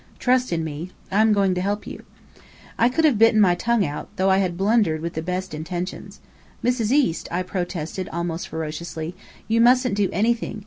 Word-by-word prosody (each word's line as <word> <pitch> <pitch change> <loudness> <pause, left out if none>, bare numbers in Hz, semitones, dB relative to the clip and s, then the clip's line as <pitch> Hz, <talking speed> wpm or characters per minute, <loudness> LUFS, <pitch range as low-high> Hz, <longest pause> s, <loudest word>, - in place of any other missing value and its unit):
Trust 255 -2 +1
in 165 -1 0
me. 160 +3 -5 0.2
I'm 215 +3 +4
going 200 -2 +3
to 180 - -2
help 205 +2 -2
you." - - -8 0.7
I 235 - +3
could 320 +6 +1
have 265 -9 +3
bitten 225 -1 +5
my 190 -4 +5
tongue 230 +2 +1
out, 145 -1 -5
though 190 -1 +2
I 190 - +4
had 180 -3 -1
blundered 195 -5 +2
with 170 +1 -4
the 160 - -3
best 180 +2 -4
intentions. 175 +4 -5 0.4
"Mrs. 240 -3 +1
East," 265 - +1
I 180 +2 -1
protested 180 -1 -4
almost 170 0 -3
ferociously, 160 +1 -5 0.3
"you 230 +1 +2
mustn't 250 +1 +4
do 200 -1 +1
anything. 220 +2 0
190 Hz, 185 wpm, -23 LUFS, 170-225 Hz, 0.7 s, bitten